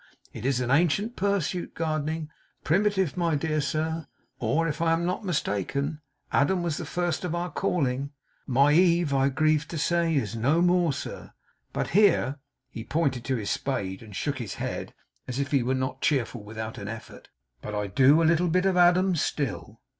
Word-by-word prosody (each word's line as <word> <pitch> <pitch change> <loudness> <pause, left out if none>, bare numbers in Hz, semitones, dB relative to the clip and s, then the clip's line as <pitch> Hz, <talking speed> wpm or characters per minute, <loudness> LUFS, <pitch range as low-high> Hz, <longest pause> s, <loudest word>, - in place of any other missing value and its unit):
It 125 - -4
is 135 -2 +1
an 125 0 -1
ancient 175 - +2
pursuit, 190 -3 -1
gardening. 155 -1 -2 0.3
Primitive, 190 -1 +1
my 170 -3 +1
dear 155 +1 0
sir. 160 +2 -2 0.3
Or, 150 +8 +1
if 155 +1 -3
I 165 -1 +3
am 165 +1 0
not 180 +5 -2
mistaken, 145 - -2 0.3
Adam 175 +6 +2
was 165 -3 -1
the - - -5
first 175 -2 -1
of 175 -2 -2
our 175 0 -3
calling. 140 -4 -1 0.4
MY 140 +2 +4
Eve, 170 -3 +4
I 135 0 +3
grieve 155 +2 +1
to 170 - -5
say 170 +1 +1
is 115 -5 -1
no 140 +9 +2
more, 175 -2 +3
sir; - - -7 0.4
but' - - -2
here 170 -8 +3 0.3
he 115 - -6
pointed 135 -4 -1
to 135 - 0
his 105 -4 -2
spade, 95 -9 -2
and 105 -3 -11
shook 140 +4 -2
his 115 -6 -5
head - - -5 0.3
as 125 - -4
if 140 +1 -2
he 140 -3 +3
were 130 +2 0
not 130 +1 -3
cheerful 125 -6 0
without 110 +1 -6
an 100 - -6
effort 110 +1 -9 0.3
'but 105 - -5
I 105 0 -1
do 135 +10 +4
a - - +3
little 170 +2 +3
bit 180 +3 +2
of 190 -1 +2
Adam 180 +1 +4
still. 145 - -3
155 Hz, 185 wpm, -27 LUFS, 130-170 Hz, 0.4 s, MY